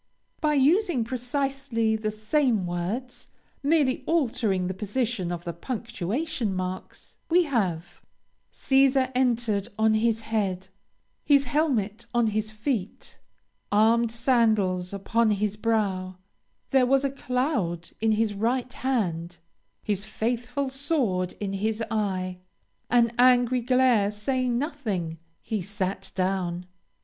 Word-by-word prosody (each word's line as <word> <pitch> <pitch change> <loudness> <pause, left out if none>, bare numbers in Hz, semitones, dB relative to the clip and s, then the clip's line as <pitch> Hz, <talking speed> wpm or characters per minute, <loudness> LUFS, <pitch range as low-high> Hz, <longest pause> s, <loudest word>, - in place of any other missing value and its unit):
By 300 -1 +2
using 300 - +3
precisely 250 -2 -1
the 215 0 -2
same 215 0 +1
words, 190 +9 -4 0.3
merely 285 -3 +2
altering 235 - +1
the 185 - -2
position 210 -1 -2
of 175 -1 -4
the 170 -1 -4
punctuation 235 - -3
marks, 185 0 -6
we 350 +2 +5
have 190 - -2 0.5
"Cæsar 265 -1 +3
entered 235 -5 +1
on 220 0 +3
his 225 0 +1
head; 195 -4 -2 0.5
his 280 -2 +4
helmet 235 -6 0
on 240 -1 +4
his 215 0 -1
feet; 215 -2 -4 0.5
armed 225 +2 +4
sandals 220 -7 +2
upon 220 +3 +1
his 210 0 0
brow; 200 -5 -1 0.5
there 260 -2 +4
was 275 +1 +3
a 275 - 0
cloud 250 - -2
in 220 0 +3
his 215 -1 +1
right 240 +4 -1
hand; 175 -10 -2 0.5
his 205 -2 -1
faithful 245 +5 -2
sword 260 - 0
in 195 -2 -4
his 220 +3 -1
eye; 185 -4 -1 0.5
an 235 -1 +3
angry 250 0 +5
glare 250 -4 +3
saying 245 +4 -1
nothing; 215 - -3 0.2
he 215 -3 -2
sat 195 0 -4
down." 185 -2 -1
225 Hz, 120 wpm, -26 LUFS, 195-255 Hz, 0.5 s, we